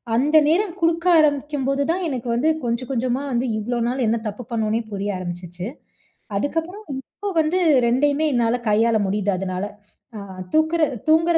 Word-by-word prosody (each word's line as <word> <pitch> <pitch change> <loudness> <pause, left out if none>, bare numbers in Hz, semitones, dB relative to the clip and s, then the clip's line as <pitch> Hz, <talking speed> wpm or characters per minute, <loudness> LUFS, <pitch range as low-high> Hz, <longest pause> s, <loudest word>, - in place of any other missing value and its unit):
அந்த 295 +6 +4
நேரம் 360 +2 +2
குடுக்க 335 +1 +1
ஆரம்பிக்கும்போதுதான் 290 +3 +1
எனக்கு 250 -2 -4
வந்து 295 +7 +2 0.2
கொஞ்சம் 235 +2 -2
கொஞ்சமா 255 +1 0
வந்து 245 +1 0
இவ்ளோ 240 +3 -2
நாள் 255 0 0
என்ன 230 - +2
தப்பு 210 +4 -5
பண்ணோம்னே 225 0 0
புரிய 205 0 -2
ஆரம்பிச்சுச்சு. 175 +1 -6 0.7
அதுக்கப்புறம் 330 - -2
இப்போ 400 +9 -6
வந்து 320 +4 0 0.3
2யுமே 285 +5 +2
என்னால 240 0 +2
கையாள 225 +1 +3
முடியுது 205 0 0
அதனால. 185 +1 -3 0.5
அ - - -5 0.3
தூக்ற 315 +2 +3 0.3
தூங்குற 325 +1 +4
255 Hz, 140 wpm, -22 LUFS, 220-315 Hz, 0.7 s, அந்த